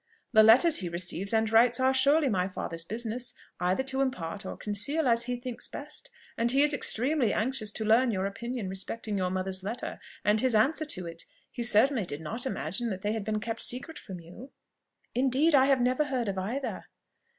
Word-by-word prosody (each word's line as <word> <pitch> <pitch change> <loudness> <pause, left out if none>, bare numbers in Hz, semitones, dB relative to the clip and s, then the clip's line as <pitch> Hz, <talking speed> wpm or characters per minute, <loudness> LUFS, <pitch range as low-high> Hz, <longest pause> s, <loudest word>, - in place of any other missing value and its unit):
The 220 - +7
letters 245 +9 +6
he 180 - -3
receives 175 +3 -1
and 220 -1 +2
writes 235 +2 +4
are 260 +1 +3
surely 280 +3 +3
my 185 -6 0
father's 165 -3 -5
business 235 +5 -4 0.2
either 180 +8 0
to 265 0 -1
impart 200 -7 -3
or - - -6
conceal, 230 +9 0
as 235 0 +2
he 250 0 -2
thinks 245 -1 -6
best; - - -8 0.3
and 230 +1 +1
he 270 +3 +4
is 295 0 +4
extremely 265 0 +1
anxious 225 -1 +1
to 220 - -2
learn 235 +4 +4
your 190 -3 -1
opinion 225 +2 -5
respecting 200 +3 -4
your 185 -2 -1
mother's 185 0 -3
letter, 215 +6 -5 0.3
and 210 +1 +3
his 255 -3 +1
answer 290 +9 +2
to 185 - -6
it. 165 0 -7 0.3
He 245 - -6
certainly 235 -1 +4
did 145 - -5
not 225 - -3
imagine 195 - -2
that 190 -2 -6
they 210 +1 0
had 220 -2 -3
been 215 +1 -2
kept 225 +1 -4
secret 280 +6 +1
from 190 -4 -9
you." 180 +11 -12 0.6
"Indeed 270 +5 +2
I 265 -2 +6
have 270 -2 +2
never 255 +4 +1
heard 255 -5 -2
of 195 -1 -3
either." 240 +9 -4
230 Hz, 200 wpm, -28 LUFS, 195-260 Hz, 0.6 s, The